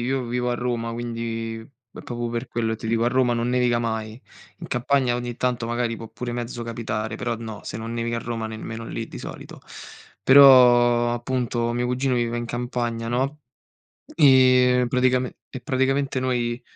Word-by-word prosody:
io 130 0 -1
vivo 125 +1 -2
a 120 - 0
Roma, 120 -1 -2
quindi 115 -1 -4
è 120 0 -15
proprio 120 -1 -4
per 120 +2 -4
quello 115 -1 -2
che - - -3
ti 115 - -7
dico: 115 +1 +1
a - - +3
Roma 125 -1 +2
non 120 +1 -1
nevica 125 -1 +2
mai. 110 -1 -3 0.4
In - - -7
campagna 125 0 +1
ogni 120 -1 -5
tanto 125 -2 -1
magari 120 0 -1
può 115 - -9
pure 120 +1 -6
mezzo 120 0 -5
capitare, 110 -2 -4
però 120 0 -2
no, 110 -2 -8
se - - -6
non 115 +1 -6
nevica 115 0 -2
a - - -3
Roma, 115 -1 -4
nemmeno 110 +1 -7
lì 115 - -5
di - - -9
solito. - - -9 0.6
Però 120 -3 +7
appunto 120 -1 -2
mio 120 +1 -1
cugino 125 +1 0
vive 120 -1 -1
in 120 - -4
campagna, 120 -1 -3
no, 135 +5 -1 0.7
e 130 -3 +5
praticame 125 0 +1
e 130 - -8
praticamente 135 +1 0
noi 120 -1 -1
120 Hz, 180 wpm, -23 LUFS, 115-125 Hz, 0.7 s, Però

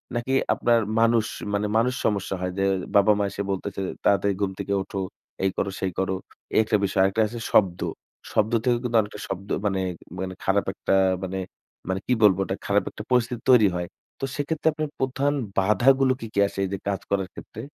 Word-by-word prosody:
নাকি 120 +3 -1 0.2
আপনার 120 -1 +3 0.2
মানুষ 115 -1 +4 0.3
মানে 105 +1 +1
মানুষ 125 +3 +2
সমস্যা 100 -2 0
হয়? 90 0 -1
যে 95 - +2 0.3
বাবা-মা 100 +1 +5
এসে - - -4
বলতেছে 100 +1 -3 0.2
"তাড়াতাড়ি 100 0 +3
ঘুম 100 -1 +1
থেকে 100 - -2
ওঠো। 95 +1 -5 0.4
এই 95 - +3
করো 100 - 0
সেই 95 - -1
করো।" 95 0 0 0.4
এই - - +5
একটা 110 -1 +2
বিষয়। 95 0 +1
আরেকটা 95 +3 +2
আছে 120 +2 -7
শব্দ। 90 -4 +4 0.5
শব্দ 110 +1 +2
থেকে 120 -1 +3
কিন্তু 120 -2 +1
অনেকটা 105 0 -8
শব্দ 95 +1 -6 0.2
মানে, 95 -2 +1 0.4
মানে 95 0 -3
খারাপ 100 +1 +2
একটা - - 0 0.3
মানে, 95 0 -3 0.5
মানে 95 0 0
কি 125 - +3
বলবো 95 -3 +6
ওটা? 95 - -2
খারাপ 100 0 +2
একটা - - -8
পরিস্থিতি 125 -1 +1
তৈরি 115 -5 +7
হয়। 90 0 -2 0.3
তো - - -1
সেক্ষেত্রে 155 +2 -2
আপনার 155 -1 -3
প্রধান 135 +2 +1 0.3
বাধাগুলো 130 +7 +4
কী, 115 - -6
কী - - 0
আসে 100 - -7
এই - - -4
যে - - -1
কাজ 100 -2 -1
করার 95 -2 +1
ক্ষেত্রে? 110 - -9
100 Hz, 195 wpm, -25 LUFS, 95-120 Hz, 0.5 s, তৈরি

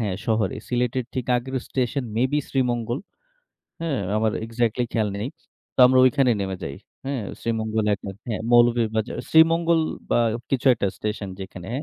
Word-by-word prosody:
হ্যাঁ 100 -5 -1
শহরে 110 -4 +1
সিলেটের 125 0 0
ঠিক 130 -2 -2
আগের 130 +2 -4
স্টেশন 130 +1 -1
মেবি 130 +5 +2
শ্রীমঙ্গল। 120 -1 0 0.8
হ্যাঁ 160 -5 -1 0.2
আমার 110 0 +1
এক্সাক্টলি 115 +1 0
খেয়াল 110 -3 +1
নেই। 105 - -3 0.5
তো - - -50
আমরা 130 0 +4
ঐখানেই 125 -2 +3
নেমে 95 -1 -3
যাই। 70 -2 -5 0.3
হ্যাঁ 135 -4 -2 0.2
শ্রীমঙ্গল 110 -1 -1
এক 100 - -11 0.3
হ্যাঁ, 110 - -2
মৌলভীবাজার 120 -2 +3
শ্রীমঙ্গল 165 +1 +5 0.3
বা - - +3 0.3
কিছু 135 0 0
একটা 100 - -1
স্টেশন 105 -2 -4
যেখানে 95 -1 -8
120 Hz, 145 wpm, -24 LUFS, 110-130 Hz, 0.8 s, শ্রীমঙ্গল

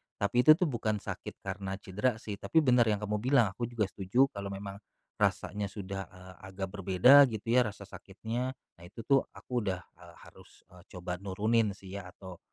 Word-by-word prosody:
tapi 100 +4 0
itu 155 - +9
tuh 175 0 0
bukan 110 -3 -2
sakit - - -6
karena 95 0 -4
cedera 105 +5 -1
sih. 105 -3 -7
Tapi 160 -1 +2
benar 125 -4 +4
yang 105 -1 0
kamu 105 0 -1
bilang, 120 -3 +3
aku 115 +5 -4
juga 120 -2 -1
setuju 120 +8 +2
kalau 100 0 -6
memang 100 0 -7 0.4
rasanya 105 -1 0
sudah, 95 -1 -6
eee, 90 0 -14
agak 95 0 -5
berbeda 100 +9 +6
gitu 115 -1 -6
ya 125 -1 +4
rasa 105 -1 -8
sakitnya. 115 +6 -5 0.3
Nah - - -14
itu 115 +5 -10
tuh 135 +3 +3
aku - - -15 0.2
udah, 95 -2 -1 0.2
eee, 85 -1 -15
harus, - - -19
eee, 90 -1 -16
coba 90 0 -4
nurunin 105 +2 +1
sih 95 -1 -13
ya, 95 - -8
atau 95 -3 -11
100 Hz, 190 wpm, -30 LUFS, 95-120 Hz, 0.4 s, itu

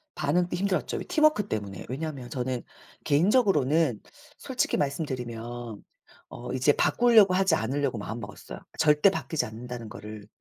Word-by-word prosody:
반응도 175 +5 0
힘들었죠 190 +1 -1
왜 - - -4
팀워크 305 -9 +3
때문에. 100 -2 -4
왜냐하면 140 -2 -5
저는 125 -1 -3 0.4
개인적으로는 160 - +3 0.4
솔직히 260 -2 -1
말씀드리면 120 -6 -4 0.5
어 125 +1 -7
이제 130 +3 +3
바꾸려고 225 -3 +5
하지 190 -2 +3
않으려고 135 0 -1
마음먹었어요. 105 0 -7 0.2
절대 150 +5 +5
바뀌지 160 -4 -2
않는다는 115 +1 -8
거를 105 0 -9
140 Hz, 370 characters per minute, -27 LUFS, 120-175 Hz, 0.5 s, 바꾸려고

